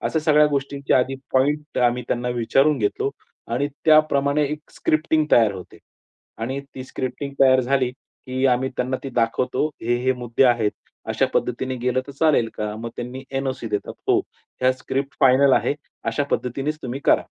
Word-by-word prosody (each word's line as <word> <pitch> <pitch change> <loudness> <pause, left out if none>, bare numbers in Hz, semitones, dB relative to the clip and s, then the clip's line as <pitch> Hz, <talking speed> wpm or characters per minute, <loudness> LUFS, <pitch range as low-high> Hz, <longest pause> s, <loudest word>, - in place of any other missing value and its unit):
अशा 160 - 0
सगळ्या 150 -1 +4
गोष्टींची 140 -1 -2
आधी 130 +1 +3 0.2
पॉइंट 145 +3 +1
आम्ही 125 0 +2
त्यांना 125 0 -1
विचारून 135 +4 +2
घेतलो. 110 +5 0 0.4
आणि 130 +5 0 0.2
त्याप्रमाणे 150 -2 +4
एक 150 +1 -5
स्क्रिप्टिंग 155 0 +1
तयार 115 -4 +5
होते. 95 -2 -10 0.6
आणि 130 +5 -3
ती 130 - -7
स्क्रिप्टिंग 130 +2 -5
तयार 130 -1 +6
झाली 130 0 +1
की 130 0 -7
आम्ही 130 +1 +2
त्यांना 130 +1 -1
ती 135 - -4
दाखवतो. 120 +4 0 0.2
हे 120 +1 +1
हे 130 - +4
मुद्दे 125 0 0
आहेत. 120 -4 +3 0.4
अशा - - +1
पद्धतीने 130 +2 -1
गेलं 125 +1 +1
तर 140 - -9
चालेल 140 -5 +2
का? 105 0 -3
मग 115 +1 -6
त्यांनी 125 +2 -6
एन-ओ-सी 135 -3 -3
देतात. 105 -1 -3 0.2
हो. - - +4 0.4
या 130 0 +5
स्क्रिप्ट 135 +2 -4
फायनल 135 0 +5
आहे 145 - +2 0.3
अशा 115 +5 0
पद्धतीनेच 135 +5 -2
तुम्ही 130 +2 -4
करा. - - +4
130 Hz, 165 wpm, -22 LUFS, 125-140 Hz, 0.6 s, तयार